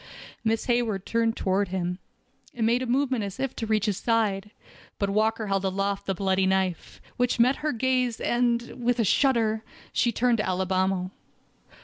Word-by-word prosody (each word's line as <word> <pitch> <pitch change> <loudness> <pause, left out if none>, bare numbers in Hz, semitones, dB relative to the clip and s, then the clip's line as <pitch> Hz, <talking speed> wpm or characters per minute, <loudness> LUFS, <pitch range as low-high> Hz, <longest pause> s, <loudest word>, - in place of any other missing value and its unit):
Miss 225 0 0
Hayward 235 -6 0
turned 230 0 0
toward 195 +1 +1
him, 180 0 -3 0.6
and 230 -2 0
made 235 +3 +2
a 255 - -3
movement 260 -2 +1
as 200 +3 -6
if 270 -1 -2
to 225 - -3
reach 215 -1 +1
his 205 -4 0
side, 210 -4 0 0.5
but 200 -1 -1
Walker 220 +2 +1
held 195 -1 0
aloft 195 +1 -1
the 195 - 0
bloody 190 0 +1
knife, 190 -2 -1 0.2
which 245 -1 +1
met 250 +3 +4
her 305 0 -1
gaze, 250 -1 0
and, 240 0 0
with 245 0 +2
a 230 - +2
shudder, 225 -2 +2 0.3
she 240 - +2
turned 235 0 +2
to - - +1
Alibamo. 185 0 0
220 Hz, 170 wpm, -26 LUFS, 195-240 Hz, 0.6 s, met